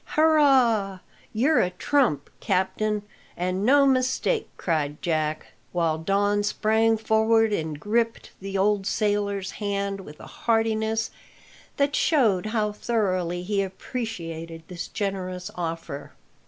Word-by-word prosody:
"Hurrah! 260 -11 +4 0.3
You're 270 +9 +3
a 180 - +2
trump, 180 - 0
captain, 200 +2 0 0.3
and 185 +2 -1
no 275 +4 +5
mistake!" 265 - +1
cried 150 -4 -1
Jack, 155 -2 -2 0.2
while 165 -3 +1
Don 205 +4 +1
sprang 220 +2 +2
forward 220 0 +3
and 155 -5 -2
gripped 230 +5 -1
the 195 0 -3
old 200 0 +2
sailor's 205 -3 0
hand 200 -1 -2
with 150 -6 -11
a - - -10
heartiness 225 -1 0 0.7
that 280 0 +2
showed 215 - +2
how 215 -1 0
thoroughly 185 -6 -1
he 200 +1 0
appreciated 170 -6 -5
this 180 -1 -5
generous 185 -2 -4
offer. 165 -4 -5
205 Hz, 115 wpm, -25 LUFS, 180-225 Hz, 0.7 s, no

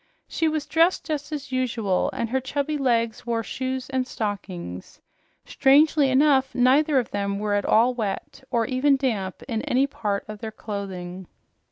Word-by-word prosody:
She 325 - 0
was 310 -1 -1
dressed 335 +3 +2
just 300 -1 -3
as 285 -3 -5
usual, 235 -7 0
and 230 -1 -3
her 265 +1 +1
chubby 285 +3 -2
legs 230 -4 +1
wore 230 -1 0
shoes 260 +2 -4
and 260 -1 0
stockings. 185 - -5 0.5
Strangely 285 +1 +4
enough, 265 0 +3
neither 270 +4 +4
of 245 - 0
them 200 -1 -1
were 210 0 -1
at 205 0 +1
all 235 +3 +4
wet 225 +4 -4
or 230 -1 +1
even 270 +3 +2
damp 215 -9 -2
in 225 -4 -3
any 260 +2 +2
part 205 -7 -3
of 215 -1 -8
their 220 - -5
clothing. 190 -4 -6
250 Hz, 165 wpm, -24 LUFS, 205-275 Hz, 0.5 s, Strangely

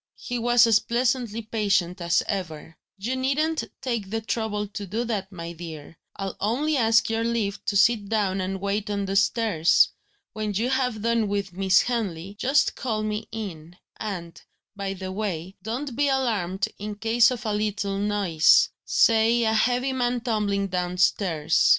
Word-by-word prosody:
He 245 -1 -4
was 240 0 +5
as 225 -2 +5
pleasantly 235 -2 -1
patient 200 -5 0
as 170 0 +2
ever: 165 -5 -4 0.2
"You 230 +7 -2
needn't 295 +5 0 0.2
take 235 -7 -2
the 225 +2 -1
trouble 220 -2 -2
to 200 0 -7
do 220 +6 -2
that, 210 -5 -3
my 170 -2 -7
dear; 160 -2 -9 0.2
I'll 195 -1 -4
only 275 +9 0
ask 225 -3 +3
your 225 0 0
leave 230 -4 -1
to 200 - +1
sit 210 -1 +3
down 200 -4 0
and 190 +1 -3
wait 200 +2 -2
on 200 -1 -1
the 195 0 -3
stairs. 200 -5 +3 0.4
When 215 -2 -3
you 235 +6 0
have 250 -5 0
done 230 -2 +1
with 200 -2 -2
Miss 190 +1 +3
Henley, 200 -7 -3
just 280 +3 +2
call 220 -4 -2
me 215 0 -3
in. 180 -6 -7 0.2
And, 180 -6 -6 0.3
by 195 -1 -4
the 185 0 -6
way, 190 -3 -4
don't 245 +4 -4
be 285 +2 +2
alarmed 210 -9 0
in 210 0 -5
case 225 +2 +4
of 250 -3 -5
a 215 - 0
little 205 -2 -1
noise 200 -6 +4
say 230 +1 +3
a 220 -1 +2
heavy 250 +4 +1
man 245 -1 0
tumbling 210 -4 0
downstairs. 180 -2 +1
210 Hz, 165 wpm, -25 LUFS, 195-235 Hz, 0.4 s, was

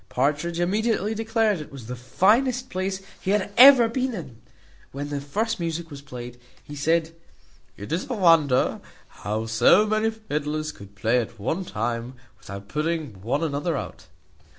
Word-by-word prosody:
Partridge 150 +6 0
immediately 210 +3 0
declared 220 -3 +1
it 150 - -10
was 135 -5 -10
the 125 +2 -5
finest 240 - +1
place 190 +1 -3 0.2
he - - -5
had 205 0 +1
ever 255 -2 +9
been 255 +1 -2
in. 135 - -9 0.5
When 145 +2 -5
the 145 -1 -3
first 215 +11 -2
music 165 -1 -4
was 140 -1 -8
played, 125 -3 -9 0.2
he 145 - -10
said, 160 +2 +1 0.6
"It 100 - -8
was 170 +8 -2
a - - -1
wonder 165 - +3 0.3
how 110 +3 -4
so 120 - +5
many 215 +1 +1
fiddlers 155 -8 -3
could 100 -6 -14
play 115 +4 +2
at 115 0 -5
one 160 - -2
time, 120 0 -3 0.2
without 100 0 -9
putting 150 - -3
one 135 - -1
another 155 +1 -1
out." 70 - -7
155 Hz, 160 wpm, -24 LUFS, 125-205 Hz, 0.6 s, ever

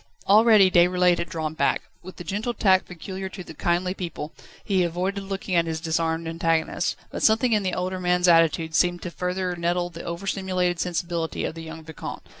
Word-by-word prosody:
Already 210 -2 +6
Déroulède 180 0 +4
had 170 - -3
drawn 160 -3 -3
back. 140 -3 +1 0.2
With 185 +1 -10
the - - -8
gentle 210 +8 -3
tact 190 -3 +3
peculiar 190 +2 -6
to 185 -1 -8
kindly 175 +3 0
people, 170 -5 -6 0.3
he 195 -3 +1
avoided 180 +4 -1
looking 195 -1 -5
at 170 -1 +3
his 160 -1 -2
disarmed 165 0 -1
antagonist. 165 +2 0 0.2
But - - -5
something 225 +2 +4
in 210 - +3
the 185 -2 -1
older 185 +1 -2
man's 180 0 +2
attitude 165 -1 +4
seemed 175 +1 +2
to 180 - -5
further 180 +1 -2
nettle 175 +1 -1
the 170 0 -8
over 170 +3 -5
stimulated 185 -3 -1
sensibility 170 -2 -2
of - - -3
the 165 - -8
young 160 0 -9
Vicomte. 160 0 -8
180 Hz, 190 wpm, -24 LUFS, 165-185 Hz, 0.3 s, Already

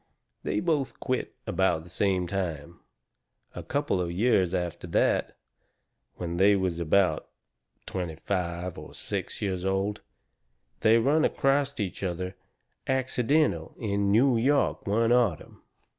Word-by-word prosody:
They - - -1
both 155 -6 -1
quit 130 -2 -2
about 85 -3 +1
the 90 - -14
same 95 -1 +1
time. 85 -3 -4 0.7
A - - -6
couple 145 -10 -1
of 85 - -2
years 95 -2 +2
after 90 -1 -3
that, 85 - +1 0.8
when 85 -1 -4
they 100 +2 +5
was 95 -3 -1
both - - -3
about 90 +3 +2 0.6
twenty 90 -4 -4
five 90 0 -3
or - - -11
six - - -4
years 95 -3 -2
old, 95 +2 -1 0.8
they 110 +1 +5
run 145 +7 +3
acrost 140 -1 +1
each 100 -4 -3
other 90 0 -3 0.5
accidental 130 +3 +1
in 100 -4 0
New 120 +3 +4
York 135 +1 +1
one 115 +3 +2
autumn. 120 -10 +1
100 Hz, 130 wpm, -27 LUFS, 90-125 Hz, 0.8 s, they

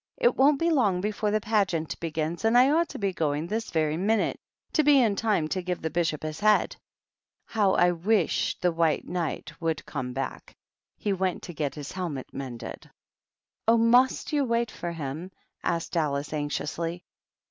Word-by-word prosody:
It 485 -1 +3
won't 280 +2 +5
be 335 +3 +1
long 210 - +3
before 210 +2 -1
the 215 +1 +2
Pageant 200 -8 0
begins, 165 +1 -3
and 225 +2 +4
I 255 +3 +6
ought 330 +1 +2
to - - -7
be 200 -2 -1
going 150 -2 -1
this 220 +5 -3
very 155 -2 0
minute, 210 +4 +1 0.3
to 310 - +4
be 290 -1 +6
in 225 -5 +3
time 205 -7 +1
to 185 - -1
give 180 0 -3
the 160 - -3
Bishop 160 -2 -1
his 155 0 -4
head. 215 0 +3 0.7
How 205 -4 +2
I 175 0 +4
wish 180 +1 +1
the 180 - +1
White 165 -1 +1
Knight 175 -3 -3
would 160 -2 -1
come 130 -4 -4
back! 135 +1 -5 0.4
He 205 - -1
went 185 -1 -1
to 175 - -7
get 150 -3 -2
his 145 -2 -7
helmet 170 -8 -5
mended." 130 -4 -7 0.8
"Oh, 230 +1 +6
must 245 +6 +3
you 290 -1 +3
wait 235 -2 0
for 175 - -5
him?" 160 +2 -5 0.3
asked 170 +1 -2
Alice, 150 -2 -1
anxiously. 155 +3 -3
180 Hz, 180 wpm, -27 LUFS, 155-220 Hz, 0.8 s, I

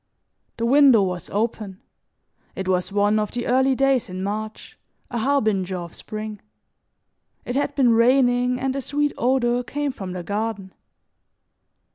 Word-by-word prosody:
The 230 - -1
window 265 -4 +6
was 180 -2 -4
open; 210 -2 -3 0.8
it 190 - -4
was 180 0 0
one 205 +1 +2
of 210 -1 -1
the 240 -1 -3
early 260 +2 +2
days 270 -4 +1
in 185 +1 -5
March, 215 +2 -5 0.3
a 235 - -2
harbinger 215 -8 0
of 170 -1 -8
spring. 215 -1 -7 1.1
It 245 - -4
had 285 0 -1
been 260 -4 +4
raining 245 +1 +3
and 265 0 -1
a 275 - -2
sweet 290 +2 -1
odor 245 -1 +1
came 285 +3 -3
from 190 -8 -7
the 180 -1 -5
garden. 205 0 -4
230 Hz, 145 wpm, -23 LUFS, 200-260 Hz, 1.1 s, window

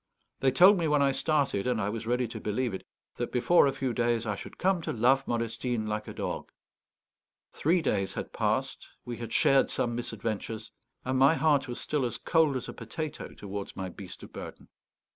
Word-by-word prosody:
They 135 - +3
told 180 +9 +7
me 165 - +1
when 150 -1 +3
I 140 - +4
started, 135 -7 0
and 125 -3 +1
I 100 - 0
was 115 +1 -5
ready 125 +1 +1
to 115 - -6
believe 110 +2 -1
it, 95 - -5 0.3
that 120 - -3
before 130 +6 +5
a - - +2
few 130 -2 -2
days 120 -1 +1
I 105 - 0
should - - -10
come 185 -1 +2
to - - -3
love 130 +4 +3
Modestine 115 0 -1
like 105 0 -3
a - - -6
dog. - - -4 1.0
Three 165 +2 +2
days 100 -8 0
had - - -5
passed, - - -1 0.2
we 120 -1 -5
had 115 -1 -6
shared 135 0 +4
some 120 -1 -1
misadventures, 110 -1 -4 0.3
and 130 0 0
my 140 +4 +6
heart 150 -4 +3
was 120 - -5
still 150 -3 -1
as 120 - -2
cold 160 -5 +2
as 125 - -6
a - - -6
potato 150 +7 -5
towards 100 0 -6
my 95 -1 -4
beast 90 0 -10
of - - -12
burden. - - -9
120 Hz, 200 wpm, -29 LUFS, 110-140 Hz, 1.0 s, told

